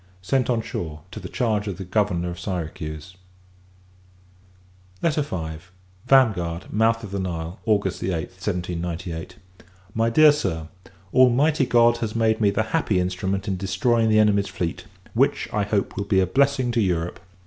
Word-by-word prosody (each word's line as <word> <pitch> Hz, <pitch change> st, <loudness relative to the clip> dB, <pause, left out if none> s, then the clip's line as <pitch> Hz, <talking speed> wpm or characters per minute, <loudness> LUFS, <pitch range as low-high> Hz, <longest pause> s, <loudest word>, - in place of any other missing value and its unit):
Sent 130 Hz, +5 st, +1 dB
on 115 Hz, -2 st, +1 dB
shore, 80 Hz, -6 st, -5 dB
to -, -, -7 dB
the -, -, -8 dB
charge 110 Hz, -4 st, 0 dB
of 95 Hz, -4 st, -4 dB
the 95 Hz, -, -6 dB
Governor 90 Hz, -3 st, 0 dB
of 85 Hz, -, -8 dB
Syracuse. 80 Hz, -2 st, -5 dB, 1.8 s
V. 155 Hz, -2 st, +1 dB, 0.9 s
Vanguard, 95 Hz, -11 st, +2 dB
Mouth 115 Hz, +2 st, +2 dB
of 100 Hz, -, -7 dB
the 100 Hz, -, -2 dB
Nile, 85 Hz, -1 st, -4 dB
August 100 Hz, -3 st, +1 dB
8th, 90 Hz, +1 st, -4 dB
1798. 90 Hz, -3 st, -4 dB, 0.6 s
MY 115 Hz, +1 st, +1 dB
DEAR 150 Hz, +6 st, +7 dB
SIR, 80 Hz, -, -3 dB, 0.4 s
Almighty 130 Hz, +3 st, +4 dB
God 120 Hz, -1 st, +4 dB
has 115 Hz, -2 st, -4 dB
made 110 Hz, -1 st, +2 dB
me 105 Hz, -, +4 dB
the 100 Hz, +2 st, +1 dB
happy 110 Hz, -, +2 dB
instrument 95 Hz, +2 st, -2 dB
in 95 Hz, -2 st, -1 dB
destroying 110 Hz, +5 st, +1 dB
the 110 Hz, -, +4 dB
enemy's 105 Hz, -2 st, +3 dB
fleet; 85 Hz, -3 st, -4 dB, 0.3 s
which, -, -, +2 dB
I 105 Hz, -, +1 dB
hope, 100 Hz, 0 st, -1 dB
will 100 Hz, -, -3 dB
be 100 Hz, -1 st, +2 dB
a 95 Hz, -, +3 dB
blessing 135 Hz, +4 st, +2 dB
to 120 Hz, -1 st, +1 dB
Europe. 90 Hz, -3 st, -1 dB
100 Hz, 155 wpm, -23 LUFS, 90-115 Hz, 1.8 s, DEAR